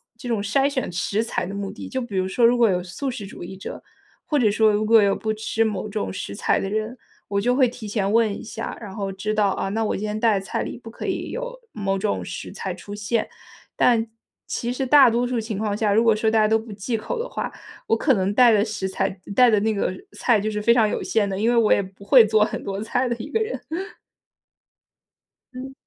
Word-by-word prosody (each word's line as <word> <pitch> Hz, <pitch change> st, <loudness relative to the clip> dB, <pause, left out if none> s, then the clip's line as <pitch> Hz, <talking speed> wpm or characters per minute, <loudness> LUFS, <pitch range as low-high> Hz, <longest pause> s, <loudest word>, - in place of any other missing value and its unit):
这 240 Hz, +2 st, -8 dB
种 220 Hz, -3 st, 0 dB
筛 275 Hz, +7 st, +2 dB
选 260 Hz, -7 st, -2 dB
食 200 Hz, +5 st, -1 dB
材 225 Hz, -, -2 dB
的 200 Hz, -, -6 dB
目 200 Hz, -1 st, -4 dB
的。 215 Hz, -, -9 dB
就 260 Hz, -, -2 dB
比 240 Hz, -6 st, -6 dB
如 185 Hz, 0 st, +1 dB
说 230 Hz, +5 st, +2 dB
如 240 Hz, +1 st, +5 dB
果 230 Hz, -3 st, +5 dB
有 180 Hz, -1 st, 0 dB
素 190 Hz, +10 st, -4 dB
食 230 Hz, -6 st, -6 dB
主 195 Hz, -, -9 dB
义 190 Hz, +2 st, -8 dB
者， -, -, -7 dB, 0.5 s
或 295 Hz, -, +1 dB
者 220 Hz, -6 st, +3 dB
说 215 Hz, 0 st, +4 dB
如 210 Hz, +1 st, 0 dB
果 225 Hz, 0 st, +6 dB
有 200 Hz, -1 st, +3 dB
不 220 Hz, 0 st, -2 dB
吃 220 Hz, +1 st, 0 dB
某 210 Hz, -1 st, -3 dB
种 205 Hz, -, -3 dB
食 100 Hz, -, -5 dB
材 -, -, +1 dB
的 195 Hz, -, -3 dB
人， 215 Hz, +3 st, -2 dB, 0.3 s
我 200 Hz, 0 st, 0 dB
就 245 Hz, +3 st, +2 dB
会 260 Hz, -2 st, +4 dB
提 230 Hz, -2 st, -8 dB
前 205 Hz, -1 st, -1 dB
问 225 Hz, -2 st, +4 dB
一 -, -, -9 dB
下， 225 Hz, 0 st, -6 dB
然 200 Hz, -4 st, -9 dB
后 195 Hz, -2 st, -3 dB
知 210 Hz, +3 st, -3 dB
道， 210 Hz, -2 st, +2 dB
啊， 195 Hz, -, -2 dB
那 220 Hz, +2 st, -1 dB
我 -, -, -1 dB
今 210 Hz, -, -4 dB
天 210 Hz, +1 st, -3 dB
带 220 Hz, -3 st, +3 dB
的 195 Hz, -, -10 dB
菜 -, -, -2 dB
里 -, -, -5 dB
不 230 Hz, -2 st, -11 dB
可 -, -, -6 dB
以 -, -, -3 dB
有 -, -, -5 dB
某 195 Hz, -2 st, -1 dB
种 205 Hz, +2 st, -1 dB
食 -, -, -7 dB
材 -, -, -4 dB
出 205 Hz, -, -10 dB
现。 210 Hz, +3 st, -1 dB, 0.5 s
但 230 Hz, -2 st, +3 dB, 0.4 s
其 240 Hz, +1 st, -3 dB
实 260 Hz, +1 st, -2 dB
大 270 Hz, -2 st, +7 dB
多 240 Hz, +2 st, +1 dB
数 245 Hz, -1 st, -1 dB
情 220 Hz, -2 st, -4 dB
况 210 Hz, -1 st, -1 dB
下， 210 Hz, -1 st, +1 dB
如 225 Hz, +3 st, +4 dB
果 225 Hz, -2 st, +4 dB
说 220 Hz, +1 st, +1 dB
大 220 Hz, -, +2 dB
家 215 Hz, -, +4 dB
都 220 Hz, +1 st, +3 dB
不 220 Hz, -1 st, -10 dB
忌 210 Hz, +4 st, -3 dB
口 -, -, -4 dB
的 480 Hz, +2 st, -3 dB
话， -, -, -4 dB, 0.4 s
我 225 Hz, -, +2 dB
可 270 Hz, +1 st, +3 dB
能 195 Hz, -1 st, 0 dB
带 245 Hz, -2 st, +7 dB
的 210 Hz, -1 st, +4 dB
食 210 Hz, -3 st, -3 dB
材 195 Hz, +1 st, -1 dB, 0.3 s
带 250 Hz, -1 st, +6 dB
的 215 Hz, -2 st, +4 dB
那 220 Hz, 0 st, +1 dB
个 200 Hz, -, -1 dB, 0.2 s
菜 235 Hz, -4 st, +2 dB
就 215 Hz, +2 st, -2 dB
是 210 Hz, 0 st, -3 dB
非 235 Hz, -, +4 dB
常 230 Hz, -3 st, +4 dB
有 -, -, -2 dB
限 215 Hz, -3 st, +1 dB
的， 195 Hz, 0 st, -3 dB
因 225 Hz, +2 st, +2 dB
为 240 Hz, -, +2 dB
我 230 Hz, -2 st, +5 dB
也 -, -, +2 dB
不 195 Hz, +1 st, -12 dB
会 245 Hz, +2 st, +8 dB
做 215 Hz, 0 st, +4 dB
很 -, -, -5 dB
多 195 Hz, 0 st, -4 dB
菜 250 Hz, +2 st, 0 dB
的 235 Hz, -, 0 dB
一 225 Hz, -, -8 dB
个 450 Hz, -, +1 dB
人。 440 Hz, +2 st, -2 dB, 1.9 s
嗯。 265 Hz, +1 st, -7 dB
220 Hz, 280 characters per minute, -23 LUFS, 200-235 Hz, 1.9 s, 会